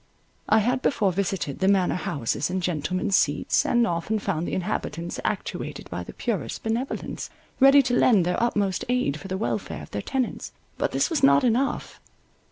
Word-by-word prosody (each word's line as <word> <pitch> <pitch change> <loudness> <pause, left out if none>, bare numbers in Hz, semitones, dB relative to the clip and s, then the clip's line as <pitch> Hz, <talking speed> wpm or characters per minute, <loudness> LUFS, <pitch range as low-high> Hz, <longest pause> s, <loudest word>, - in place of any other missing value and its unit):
I 220 - +5
had 245 +4 +1
before 205 -9 +2
visited 185 -6 -2
the 190 - +2
manor 195 -2 +3
houses 145 -4 -2
and 185 +1 -1
gentlemen's 180 +3 0
seats, 145 -3 +2
and 240 -1 +3
often 175 +3 -1
found 180 -5 -2
the - - -4
inhabitants 175 -3 -3
actuated - - -4
by - - -4
the - - -9
purest - - -3
benevolence, 230 +4 -3 0.3
ready 275 +1 +7
to 245 -1 -1
lend 220 -7 +4
their 180 +4 0
utmost 205 -5 0
aid 245 - 0
for 195 - -9
the 190 0 -3
welfare 220 - -3
of - - -13
their - - -3
tenants. 265 -3 -3 0.3
But - - 0
this - - +1
was 320 - 0
not 140 0 +5
enough. 250 +3 0
195 Hz, 175 wpm, -25 LUFS, 175-240 Hz, 0.3 s, ready